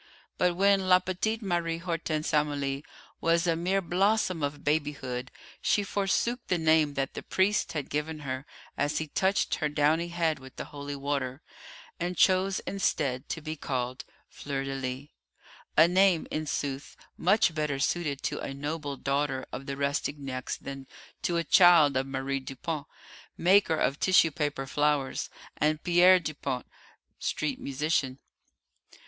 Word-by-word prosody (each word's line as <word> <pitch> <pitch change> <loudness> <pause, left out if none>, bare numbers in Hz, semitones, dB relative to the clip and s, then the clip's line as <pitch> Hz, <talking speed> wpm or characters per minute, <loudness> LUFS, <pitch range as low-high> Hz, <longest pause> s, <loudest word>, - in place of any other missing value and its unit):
But 180 -1 +2
when 195 0 +3
la 180 - +8
petite 185 +5 -2
Marie 170 -3 -1
Hortense 165 -3 -2
Amélie 145 -2 0 0.4
was 165 +1 +2
a 170 -2 +2
mere 185 +4 0
blossom 185 0 +1
of 145 0 -3
babyhood 145 -4 -1 0.3
she 205 - +2
forsook 200 +5 0
the 180 - +1
name 155 -3 +3
that 135 -1 -2
the - - -5
priest 195 +2 +1
had 150 -4 -3
given 150 +1 -3
her 130 0 -5 0.3
as 145 +1 0
he 160 - -1
touched 190 +6 +1
her 150 - +1
downy 150 +3 +2
head 165 -3 0
with 130 0 -13
the - - -5
holy 145 0 -7
water, 140 -1 -3 0.6
and 175 +1 -2
chose 190 +1 +3
instead 140 -9 -1
to 165 - -3
be 155 +1 -5
called 130 -3 -3 0.2
Fleur 140 -1 -4
de 135 0 -4
lis 135 +1 -4 0.7
a 160 +2 +8
name, 185 -2 +4
in 155 0 -2
sooth, 140 -1 -4 0.2
much 195 -1 +3
better 150 -3 -1
suited 145 0 -1
to - - -2
a 135 - -5
noble 145 0 -4
daughter 140 -1 -1
of 135 - -7
the 140 -1 -4
Rastignacs 140 -2 -2
than 135 -1 -8 0.3
to 170 - 0
a 170 - +1
child 170 -6 +6
of 130 +1 0
Marie 135 0 -2
Dupont, 140 +3 -5 0.5
maker 185 -1 +4
of 140 -2 0
tissue 185 -3 +5
paper 145 -3 -2
flowers, 145 0 0 0.3
and 155 0 +1
Pierre 180 +1 +6
Dupont, 140 -6 -4 0.5
street 150 -3 -2
musician. 140 -1 -1
150 Hz, 150 wpm, -28 LUFS, 140-175 Hz, 0.7 s, la